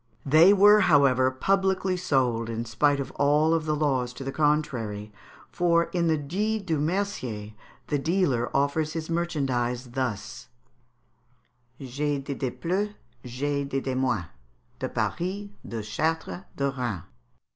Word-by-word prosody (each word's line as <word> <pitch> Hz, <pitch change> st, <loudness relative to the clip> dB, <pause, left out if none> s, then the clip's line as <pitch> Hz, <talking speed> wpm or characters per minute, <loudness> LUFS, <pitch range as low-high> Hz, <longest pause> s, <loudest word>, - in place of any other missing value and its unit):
They 155 Hz, +7 st, +7 dB
were, 205 Hz, +1 st, +7 dB
however, 140 Hz, -8 st, +4 dB
publicly 190 Hz, +6 st, +1 dB
sold 130 Hz, -10 st, 0 dB
in 115 Hz, 0 st, -3 dB
spite 140 Hz, +5 st, +2 dB
of 135 Hz, -1 st, -4 dB
all 150 Hz, +3 st, +3 dB
the 155 Hz, -1 st, -1 dB
laws 130 Hz, -5 st, 0 dB
to 135 Hz, -, -8 dB
the 135 Hz, -, -3 dB
contrary; 125 Hz, -9 st, -1 dB, 0.4 s
for, 170 Hz, -2 st, +2 dB
in 170 Hz, -2 st, +1 dB
the 160 Hz, -1 st, +2 dB
"Dit 200 Hz, +8 st, -2 dB
du 160 Hz, -4 st, 0 dB
Mercier," 145 Hz, -, -2 dB, 0.3 s
the 145 Hz, -, -1 dB
dealer 140 Hz, -7 st, +1 dB
offers 150 Hz, +3 st, 0 dB
his 165 Hz, 0 st, -4 dB
merchandise 130 Hz, -7 st, -1 dB
thus: 125 Hz, -5 st, -4 dB, 1.3 s
"J'ay 140 Hz, +2 st, -2 dB
dez 140 Hz, 0 st, -4 dB
de 130 Hz, -, 0 dB
plus, 180 Hz, +12 st, -2 dB, 0.3 s
j'ay 140 Hz, +3 st, -2 dB
dez 135 Hz, -1 st, -3 dB
de 130 Hz, -, -2 dB
moins, 130 Hz, -8 st, 0 dB, 0.5 s
De -, -, -3 dB
Paris, 195 Hz, +4 st, -3 dB
de 115 Hz, -2 st, -5 dB
Chartres, 160 Hz, -, -2 dB
de 140 Hz, 0 st, 0 dB
Rains." 120 Hz, -10 st, -3 dB
145 Hz, 135 wpm, -26 LUFS, 125-170 Hz, 1.3 s, They